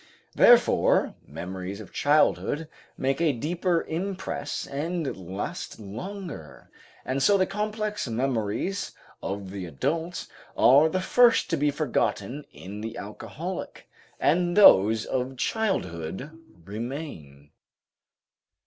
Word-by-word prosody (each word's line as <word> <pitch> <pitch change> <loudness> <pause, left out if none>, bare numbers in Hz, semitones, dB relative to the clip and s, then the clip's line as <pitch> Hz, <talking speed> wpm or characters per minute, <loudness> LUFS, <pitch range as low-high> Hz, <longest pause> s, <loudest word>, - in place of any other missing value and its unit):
Therefore - - +5
memories 90 +5 -6
of 105 - -11
childhood 150 +1 +2 0.3
make 135 +3 0
a 160 -4 +3
deeper 170 +6 0
impress 180 -3 -4
and 155 +2 -3
last 95 +4 -6
longer, 145 - -8 0.3
and 130 +2 -1
so 200 +8 +5
the 185 - +3
complex 210 -1 -3
memories 125 - -1 0.3
of 95 -1 -4
the 95 -2 -5
adult 160 - -2 0.3
are 145 +5 +6
the 185 +3 -1
first 240 +3 +4
to - - +3
be 145 +1 +2
forgotten 145 -1 -1
in 100 +3 -9
the 115 +1 -5
alcoholic, 105 -2 -7 0.3
and 175 +4 +2
those 110 - +7
of 130 +1 -2
childhood 110 - -2 0.3
remain. 100 - -7
140 Hz, 105 wpm, -26 LUFS, -, 0.3 s, those